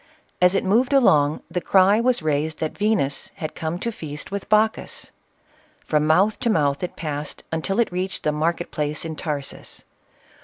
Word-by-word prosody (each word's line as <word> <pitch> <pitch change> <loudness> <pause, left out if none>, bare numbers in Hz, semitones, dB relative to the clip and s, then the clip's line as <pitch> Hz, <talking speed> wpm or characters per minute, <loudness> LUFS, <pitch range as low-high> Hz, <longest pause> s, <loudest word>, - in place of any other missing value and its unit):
As 180 +1 +5
it - - +1
moved 235 +8 +2
along, 155 - +4
the 180 - -1
cry 195 +4 +4
was 245 -6 +2
raised, 155 +1 0
that 155 - -3
Venus 205 -10 0
had 155 - -5
come 160 +1 -3
to 235 +5 -3
feast 155 -7 -7
with 200 0 -5
Bacchus. 215 +1 +1 0.7
From 150 0 +1
mouth 190 +7 +3
to 235 - 0
mouth 145 -8 +1
it 180 - -4
passed, 150 -2 -5
until 165 +6 -1
it 235 - +2
reached 185 +1 -3
the 150 - +2
market 165 +3 -1
place 150 +1 -2
in 160 -1 -4
Tarsus. 145 -3 -5
170 Hz, 170 wpm, -23 LUFS, 150-200 Hz, 0.7 s, As